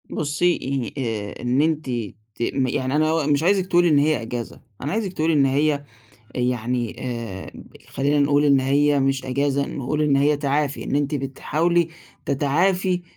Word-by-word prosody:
بُصي 155 Hz, +4 st, 0 dB, 0.4 s
ه -, -, -3 dB
آآ، 110 Hz, -5 st, -4 dB
إن 125 Hz, +3 st, +1 dB
أنتِ 155 Hz, 0 st, 0 dB, 0.5 s
ت -, -, -11 dB
يعني 130 Hz, +1 st, -1 dB
أنا 155 Hz, 0 st, +2 dB
مش 145 Hz, 0 st, +2 dB
عايزِك 190 Hz, +1 st, +2 dB
تقولي 175 Hz, -1 st, +4 dB
إن 145 Hz, -2 st, +4 dB
هي 150 Hz, -4 st, +2 dB
أجازة، 115 Hz, 0 st, -6 dB, 0.2 s
أنا 140 Hz, -, -3 dB
عايزِك 205 Hz, -3 st, -2 dB
تقولي 160 Hz, -1 st, +1 dB
إن 140 Hz, -2 st, +4 dB
هي 145 Hz, +2 st, +1 dB, 0.5 s
يعني 125 Hz, -1 st, -1 dB
آآ، 115 Hz, -7 st, -5 dB, 0.4 s
خلّينا 145 Hz, +2 st, +1 dB
نقول 145 Hz, +1 st, +3 dB
إن 140 Hz, -2 st, +4 dB
هي 140 Hz, +2 st, +2 dB
مش 135 Hz, 0 st, 0 dB
أجازة 140 Hz, +2 st, 0 dB
نقول 150 Hz, +3 st, -2 dB
إن 145 Hz, -2 st, +3 dB
هي 145 Hz, +2 st, +3 dB
تعافي 145 Hz, 0 st, -1 dB
إنِ -, -, -1 dB
أنتِ 145 Hz, 0 st, 0 dB
بتحاولي 155 Hz, +5 st, 0 dB, 0.4 s
تتعافي 180 Hz, +6 st, +1 dB
145 Hz, 160 wpm, -22 LUFS, 130-155 Hz, 0.5 s, تقولي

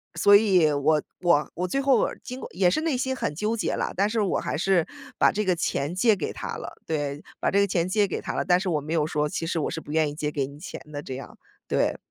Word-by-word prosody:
所 200 Hz, +4 st, +6 dB
以 185 Hz, -7 st, +5 dB
我 150 Hz, +1 st, +2 dB, 0.2 s
我 170 Hz, -4 st, +3 dB
我 180 Hz, +1 st, -1 dB
最 275 Hz, -, -1 dB
后 275 Hz, -1 st, +4 dB
尔 -, -, -3 dB
经 255 Hz, +1 st, -7 dB
过 -, -, -7 dB
也 180 Hz, -1 st, +3 dB
是 310 Hz, -, +1 dB
内 315 Hz, -6 st, 0 dB
心 260 Hz, +1 st, -1 dB
很 150 Hz, -, -2 dB
纠 215 Hz, +6 st, -1 dB
结 -, -, -1 dB
了， -, -, -2 dB
但 200 Hz, +3 st, +2 dB
是 225 Hz, 0 st, -1 dB
我 195 Hz, -, +1 dB
还 -, -, -3 dB
是 180 Hz, -1 st, +2 dB, 0.3 s
把 -, -, +5 dB
这 210 Hz, 0 st, -1 dB
个 180 Hz, -2 st, +2 dB
钱 155 Hz, -1 st, -1 dB
借 215 Hz, +2 st, +4 dB
给 170 Hz, -, -4 dB
他 -, -, -5 dB
了。 -, -, -7 dB
对， 145 Hz, -2 st, -2 dB, 0.2 s
把 -, -, +1 dB
这 200 Hz, -, +3 dB
个 200 Hz, -, +3 dB
钱 175 Hz, -2 st, 0 dB
借 205 Hz, +1 st, +2 dB
给 -, -, -3 dB
他 -, -, -4 dB
了。 -, -, 0 dB
但 180 Hz, 0 st, +4 dB
是 190 Hz, -, -4 dB
我 150 Hz, -3 st, 0 dB
没 155 Hz, +3 st, -4 dB
有 155 Hz, -2 st, +2 dB
说， 150 Hz, -1 st, 0 dB
其 165 Hz, -, -3 dB
实 165 Hz, -, -1 dB
我 -, -, -1 dB
是 160 Hz, -, -3 dB
不 145 Hz, -, -10 dB
愿 155 Hz, -1 st, +2 dB
意 145 Hz, -, -8 dB
借 150 Hz, -1 st, -2 dB
给 140 Hz, -3 st, -1 dB
你 145 Hz, +1 st, -12 dB
钱 175 Hz, -, -8 dB
的 145 Hz, 0 st, -5 dB
这 130 Hz, -, -6 dB
样， 135 Hz, -, -9 dB, 0.3 s
对。 -, -, +1 dB
175 Hz, 300 characters per minute, -25 LUFS, 150-200 Hz, 0.3 s, 所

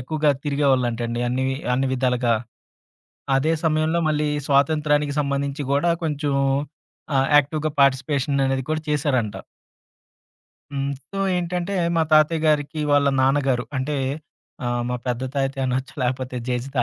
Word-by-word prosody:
ఎక్కువుగా 150 Hz, +3 st, +1 dB
తిరిగేవాళ్ళంటండి, 125 Hz, -5 st, 0 dB
అన్ని 130 Hz, +2 st, -1 dB
వి 135 Hz, -, -1 dB, 0.2 s
అన్ని 130 Hz, +2 st, +1 dB
విధాలుగా. 125 Hz, -2 st, +1 dB, 1.0 s
అదే 155 Hz, +5 st, +2 dB
సమయంలో 160 Hz, +1 st, +1 dB
మళ్ళీ 150 Hz, 0 st, 0 dB, 0.2 s
స్వాతంత్య్రానికి 145 Hz, +1 st, +2 dB
సంబంధించి 140 Hz, 0 st, -1 dB
గూడా 155 Hz, +5 st, +2 dB
కొంచుం 145 Hz, -2 st, -1 dB, 0.8 s
ఆహ్, 135 Hz, 0 st, +3 dB
యాక్టివ్‌గా 150 Hz, +2 st, +1 dB
పార్టిసిపేషననేది 135 Hz, 0 st, +2 dB
కూడా 155 Hz, 0 st, 0 dB
చేశారంట. 135 Hz, -7 st, 0 dB, 1.4 s
హ్మ్. 140 Hz, 0 st, -2 dB, 0.2 s
సో, 195 Hz, -, -6 dB, 0.2 s
ఏంటంటే, 180 Hz, +2 st, -2 dB, 0.2 s
మా 165 Hz, -, +3 dB
తాతయ్య 155 Hz, +1 st, +4 dB
గారికి 150 Hz, +1 st, +1 dB
వాళ్ళ 145 Hz, 0 st, +4 dB
నాన్నగారు 130 Hz, -2 st, +2 dB
అంటే, 145 Hz, +3 st, -2 dB, 0.7 s
ఆహ్, 120 Hz, 0 st, 0 dB
మా 125 Hz, -, -1 dB
పెద్ద 125 Hz, 0 st, -1 dB
తాతయ్యనొచ్చు, 135 Hz, -1 st, -1 dB
లేపోతే 130 Hz, 0 st, -2 dB
జేజి 125 Hz, +1 st, -2 dB
140 Hz, 120 wpm, -23 LUFS, 130-150 Hz, 1.4 s, తాతయ్య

